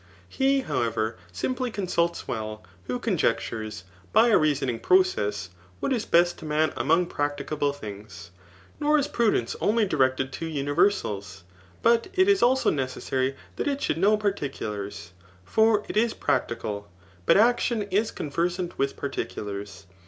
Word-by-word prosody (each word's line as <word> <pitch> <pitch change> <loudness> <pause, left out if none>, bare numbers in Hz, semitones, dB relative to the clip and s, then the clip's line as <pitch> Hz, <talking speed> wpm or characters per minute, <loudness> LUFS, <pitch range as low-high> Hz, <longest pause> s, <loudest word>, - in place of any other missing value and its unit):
He, 270 0 +2
how* 145 - -1
ever, 115 -1 -1 0.2
simply 255 - -2
consults 175 -5 -1
well, 110 -1 -4 0.2
who - - -2
conjectures, 115 - -1 0.3
by 235 - +5
a 220 - +6
reason 145 -3 +1
ing 120 -2 -2
process, 105 - +2 0.3
what - - 0
is 230 -4 -2
best 175 +1 +3
to - - -9
man 155 +1 +1
among 165 +3 +2
practicable 145 -1 -1
things. 100 -9 -9 0.5
Nor 300 +1 +3
is 290 -1 +1
prudence 220 - +1
only 220 +1 +3
directed 130 -6 +1
to 165 - -4
universals9 140 - 0 0.4
but 230 0 +4
it 375 0 +4
is 400 -1 +4
also 260 +2 +4
necessary 130 0 -1 0.2
that - - -2
it 280 -1 0
should 165 - -1
know 205 +4 +4
particulars; 105 - -4 0.3
for 220 - +3
it - - -6
is 225 +1 +2
practical) 105 -5 -2 0.4
but - - +6
action 235 0 +3
is 210 +4 +2
conversant 175 +4 -2
with 135 0 0
particu 140 -6 -4
lars. 100 -1 -7
155 Hz, 145 wpm, -26 LUFS, -, 0.5 s, a